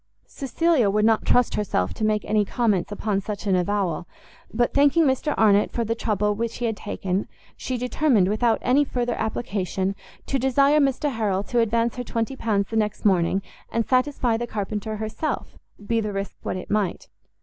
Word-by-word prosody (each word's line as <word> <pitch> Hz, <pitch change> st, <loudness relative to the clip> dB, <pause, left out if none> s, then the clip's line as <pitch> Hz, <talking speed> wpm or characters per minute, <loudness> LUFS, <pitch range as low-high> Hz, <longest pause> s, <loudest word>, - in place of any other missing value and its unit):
Cecilia 280 Hz, -3 st, +1 dB
would 210 Hz, +1 st, +2 dB
not 225 Hz, -1 st, +2 dB
trust 245 Hz, -1 st, +3 dB
herself 140 Hz, -, -1 dB
to -, -, -5 dB
make 215 Hz, -1 st, +1 dB
any 215 Hz, -1 st, +2 dB
comments 210 Hz, -3 st, 0 dB
upon 205 Hz, -1 st, -1 dB
such 210 Hz, +1 st, -6 dB
an 195 Hz, -2 st, +2 dB
avowal, 180 Hz, -3 st, -1 dB, 0.4 s
but 240 Hz, +2 st, 0 dB
thanking 285 Hz, +4 st, +4 dB
Mr 275 Hz, +2 st, +1 dB
Arnott 205 Hz, -2 st, +4 dB
for 235 Hz, -, -1 dB
the 225 Hz, -, 0 dB
trouble 210 Hz, -2 st, 0 dB
which 230 Hz, +2 st, -3 dB
he 240 Hz, -, -2 dB
had 225 Hz, -2 st, 0 dB
taken, 195 Hz, -2 st, -3 dB, 0.3 s
she 255 Hz, -, -3 dB
determined, 250 Hz, -4 st, +2 dB
without 220 Hz, +3 st, +2 dB
any 265 Hz, +4 st, +4 dB
further 245 Hz, -3 st, -2 dB
application, 200 Hz, -4 st, -2 dB, 0.3 s
to 270 Hz, -, -1 dB
desire 275 Hz, +3 st, +4 dB
Mr 280 Hz, +1 st, +1 dB
Harrel 205 Hz, -5 st, -1 dB
to 240 Hz, +3 st, -1 dB
advance 230 Hz, +1 st, +1 dB
her 250 Hz, -, -3 dB
20 230 Hz, +2 st, -2 dB
pounds 205 Hz, -5 st, 0 dB
the -, -, -3 dB
next 210 Hz, -1 st, -1 dB
morning, 190 Hz, 0 st, +2 dB, 0.3 s
and 230 Hz, -1 st, 0 dB
satisfy 255 Hz, -3 st, +1 dB
the 240 Hz, +1 st, -3 dB
carpenter 215 Hz, 0 st, -3 dB
herself, 220 Hz, +8 st, -4 dB, 0.3 s
be 230 Hz, +1 st, +1 dB
the 210 Hz, -1 st, -3 dB
risk 195 Hz, 0 st, -4 dB
what -, -, -3 dB
it 185 Hz, -, -8 dB
might. 205 Hz, -4 st, -1 dB
220 Hz, 180 wpm, -24 LUFS, 205-245 Hz, 0.4 s, thanking